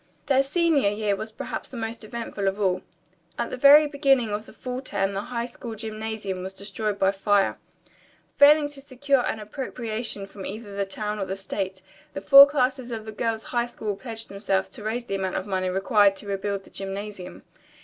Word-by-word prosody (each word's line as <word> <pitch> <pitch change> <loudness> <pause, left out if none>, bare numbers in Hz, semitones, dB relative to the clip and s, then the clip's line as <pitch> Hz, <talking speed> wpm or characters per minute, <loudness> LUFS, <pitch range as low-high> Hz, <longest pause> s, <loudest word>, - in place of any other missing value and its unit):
Their 270 -1 +4
senior 295 - +2
year 205 -1 0
was 220 +2 -6
perhaps - - -6
the 255 - -8
most 225 0 -4
eventful 215 -3 -4
of 195 +2 -1
all. 185 -2 +1 0.6
At 235 - -2
the - - -2
very 285 +4 +8
beginning 275 -6 +2
of 210 +1 -4
the - - -12
fall 255 0 -5
term 200 -6 -1
the 195 - -2
high 235 +2 -3
school 240 -1 -8
gymnasium 215 -3 -4
was 190 +1 -6
destroyed 200 +1 -3
by 195 -1 +3
fire. 200 0 +1 0.8
Failing 295 +1 +7
to 285 -1 -11
secure 275 -1 +1
an 220 - -2
appropriation 220 -2 -4
from 195 0 -10
either 205 +1 -7
the 200 0 0
town 210 +2 -4
or 190 -1 -2
state, 190 -1 -4 0.3
the - - -4
four 275 +8 +10
classes 260 -3 0
of 225 -2 -5
the 220 - -6
girls' 225 0 -2
high 240 -1 -1
school 215 -4 -4
pledged 225 +1 -6
themselves 195 -1 -1
to 250 - -11
raise 235 +3 -2
the 195 - -5
amount 190 -1 -2
of 185 - -2
money 185 -2 -1
required 195 +1 +3
to 205 - -11
rebuild 200 0 -2
the - - -18
gymnasium. 195 -1 -6
215 Hz, 195 wpm, -25 LUFS, 195-245 Hz, 0.8 s, four